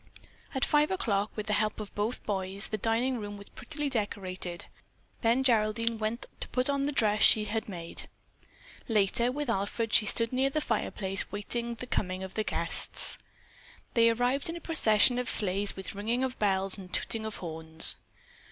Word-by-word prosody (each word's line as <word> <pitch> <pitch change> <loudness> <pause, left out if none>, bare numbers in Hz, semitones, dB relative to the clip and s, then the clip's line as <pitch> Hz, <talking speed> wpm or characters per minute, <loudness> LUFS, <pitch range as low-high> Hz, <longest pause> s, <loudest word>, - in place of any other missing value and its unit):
At 265 - +2
five 300 0 +3
o'clock, 215 - 0
with 215 - -4
the 210 - -1
help 215 +1 0
of 210 -2 -7
both 210 +4 -2
boys, 195 0 0
the 215 - -2
dining 235 +4 +1
room 205 -1 -6
was 200 - -12
prettily 295 -2 -4
decorated; 190 -7 -3 0.6
then 235 +3 +2
Geraldine 230 -1 +2
went 220 +2 -2
to - - -1
put 255 +2 0
on 280 0 0
the - - 0
dress 215 -6 +1
she 215 -1 +8
had 220 +1 -3
made. 170 -3 -5 0.8
Later, 225 +2 +2
with 290 +2 -3
Alfred, 220 +1 -2
she 215 - +5
stood 230 +3 +1
near 265 +2 +2
the 305 - -1
fireplace 195 -9 -2
waiting 235 +3 -2
the 250 - -7
coming 185 -5 -2
of 190 - -7
the 215 - -1
guests. - - 0 0.7
They 230 -1 +5
arrived 245 +6 +1
in 330 - -4
a - - -6
procession 245 -7 +4
of 250 - +1
sleighs 200 0 +2
with 190 +1 -5
ringing 225 +5 -1
of 260 -1 -3
bells 195 -1 0
and 185 -2 -11
tooting 225 -1 +1
of 220 -1 -5
horns. 160 -1 0
220 Hz, 180 wpm, -29 LUFS, 200-245 Hz, 0.8 s, she